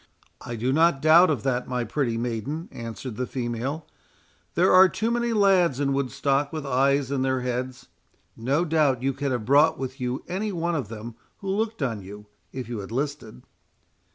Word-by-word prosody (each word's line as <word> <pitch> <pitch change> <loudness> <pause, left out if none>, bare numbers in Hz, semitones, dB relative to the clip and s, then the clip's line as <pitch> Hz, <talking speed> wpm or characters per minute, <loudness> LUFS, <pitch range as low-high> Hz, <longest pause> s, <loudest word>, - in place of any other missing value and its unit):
"I 120 -1 -5
do 125 +4 0
not 165 -1 +4
doubt 160 +5 +6
of 150 - -1
that, 130 -2 -1
my 125 -1 -1
pretty 120 0 -1
maiden," 120 - -3
answered 115 0 -7
the 125 - -2
female; 125 +5 -3 0.7
"there 180 +2 +4
are 185 0 +8
too 225 +5 -1
many 240 0 0
lads 190 - +3
in 140 -1 +1
Woodstock 140 +1 0
with 155 -2 -5
eyes 135 +1 +2
in 140 -2 0
their 130 -1 0
heads—No 125 +3 -4
doubt 150 -6 +2
you 135 0 +1
could 140 +1 -2
have 120 -4 -2
brought 150 +5 +4
with 130 0 -6
you 125 +1 -2
any 200 +4 -2
one 170 -1 -1
of 140 -9 -2
them 115 +2 -8 0.2
who 195 - -6
looked 215 -3 -1
on 115 -6 -2
you, 105 +2 -10 0.3
if 130 -3 -6
you 120 -2 -5
had 100 +1 -8
listed." 140 -3 -4
135 Hz, 180 wpm, -25 LUFS, 125-160 Hz, 0.7 s, are